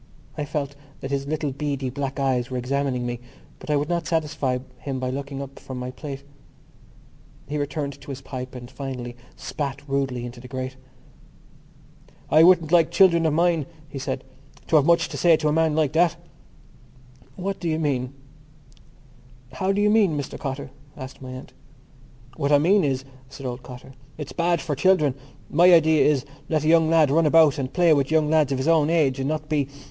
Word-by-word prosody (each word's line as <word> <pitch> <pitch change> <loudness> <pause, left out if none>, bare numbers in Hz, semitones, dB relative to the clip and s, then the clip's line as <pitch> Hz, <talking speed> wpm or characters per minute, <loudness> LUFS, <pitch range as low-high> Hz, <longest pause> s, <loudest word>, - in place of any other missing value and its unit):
I 150 - -3
felt 140 -1 -3 0.3
that 135 - -5
his 140 0 -2
little 150 -1 -2
beady 140 -2 -3
black 140 +1 -4
eyes 130 -3 0
were 130 - -3
examining 130 0 -1
me 120 -1 -3 0.4
but - - -11
I 150 - +3
would 145 +1 0
not 170 -1 -1
satisfy 150 -5 0 0.2
him 135 -2 -4
by 130 0 -2
looking 140 +1 -5
up 135 0 -11
from 130 - -8
my 125 0 -5
plate. 140 0 -8 1.2
He 150 +1 -3
returned 140 -1 -4
to 145 - -13
his 135 -1 -5
pipe 130 -1 -7
and 120 0 -9
finally 125 -3 -6 0.2
spat 140 -1 -5
rudely 135 -3 -1
into 120 0 -9
the 125 - -11
grate. 130 0 -5 1.6
"I 155 - +7
wouldn't 165 -2 +5
like 170 -3 +5
children 170 -4 +4
of 155 - +1
mine," 165 -2 +2 0.2
he 140 - -6
said, 130 0 -4 0.4
"to - - +1
have 145 - +3
too - - -1
much 170 0 +4
to - - -6
say 170 -2 +5
to 155 0 -1
a - - +1
man 160 -1 +2
like 155 -2 +1
that." 170 0 +3 1.2
"How 195 +2 -2
do 175 -3 -4
you 155 - 0
mean, 135 -5 -1 1.4
Mr 195 - +1
Cotter?" 135 -1 -5 0.3
asked 130 +1 -9
my 130 - -8
aunt. 130 0 -9 0.8
"What 140 -1 0
I 145 - +7
mean 185 +7 +3
is," 135 -2 -1 0.2
said 135 0 -10
old 125 0 -4
Cotter, 130 +1 -11 0.2
"it's 150 -2 -7
bad 170 -1 +1
for 160 -3 -3
children. 155 -2 +3 0.3
My 175 +4 +5
idea 160 -2 +5
is: 145 -2 +2 0.2
let 155 -2 +1
a - - 0
young 160 -1 +5
lad 160 -4 +4
run 160 +1 +3
about 155 -2 +5
and 130 -1 -3
play 175 -3 +4
with 140 -2 +1
young 155 -1 +2
lads 155 -3 +3
of 135 - 0
his 130 +3 -2
own 160 -2 +4
age 150 -6 +2
and 135 +1 -1
not 155 -1 -3
be.... 150 -3 0
145 Hz, 190 wpm, -24 LUFS, 135-160 Hz, 1.6 s, I